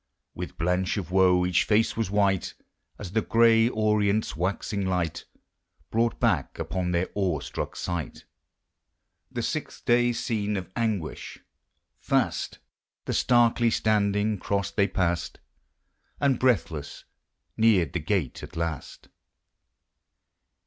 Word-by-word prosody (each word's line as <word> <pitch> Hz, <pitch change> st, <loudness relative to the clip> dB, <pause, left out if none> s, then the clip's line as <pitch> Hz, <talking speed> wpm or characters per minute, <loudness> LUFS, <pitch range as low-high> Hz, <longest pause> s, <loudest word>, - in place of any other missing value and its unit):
With -, -, -7 dB
blanch 90 Hz, +4 st, 0 dB
of 90 Hz, -4 st, -4 dB
woe 90 Hz, -1 st, +4 dB
each 90 Hz, 0 st, +2 dB
face 110 Hz, +1 st, +2 dB
was 115 Hz, -4 st, -1 dB
white, 100 Hz, -2 st, +1 dB, 0.4 s
As 95 Hz, -4 st, -7 dB
the 110 Hz, +2 st, +1 dB
gray 115 Hz, +1 st, +4 dB
Orient's 105 Hz, -2 st, +1 dB
waxing 100 Hz, +3 st, -2 dB
light 90 Hz, -4 st, -2 dB, 0.7 s
Brought 115 Hz, +1 st, +1 dB
back 95 Hz, -, 0 dB
upon 90 Hz, -1 st, -2 dB
their 90 Hz, +1 st, 0 dB
awe 95 Hz, -7 st, 0 dB
struck -, -, -5 dB
sight 85 Hz, -5 st, -5 dB, 1.1 s
The -, -, -3 dB
sixth -, -, -4 dB
day 120 Hz, 0 st, +4 dB
scene 105 Hz, -3 st, -2 dB
of 95 Hz, -1 st, -6 dB
anguish. 110 Hz, -8 st, -3 dB, 0.6 s
Fast -, -, 0 dB, 0.5 s
The -, -, -2 dB
starkly 120 Hz, -1 st, +3 dB
standing 105 Hz, -1 st, +1 dB
cross 100 Hz, +1 st, -1 dB
they 100 Hz, -2 st, +2 dB
passed. 85 Hz, -4 st, -1 dB, 0.8 s
And, 140 Hz, -4 st, +2 dB
breathless, 85 Hz, -, 0 dB, 0.5 s
neared 105 Hz, -9 st, +3 dB
the 90 Hz, -, 0 dB
gate 80 Hz, -, -1 dB
at -, -, -10 dB
last. 85 Hz, -4 st, -4 dB
100 Hz, 120 wpm, -26 LUFS, 90-110 Hz, 1.1 s, woe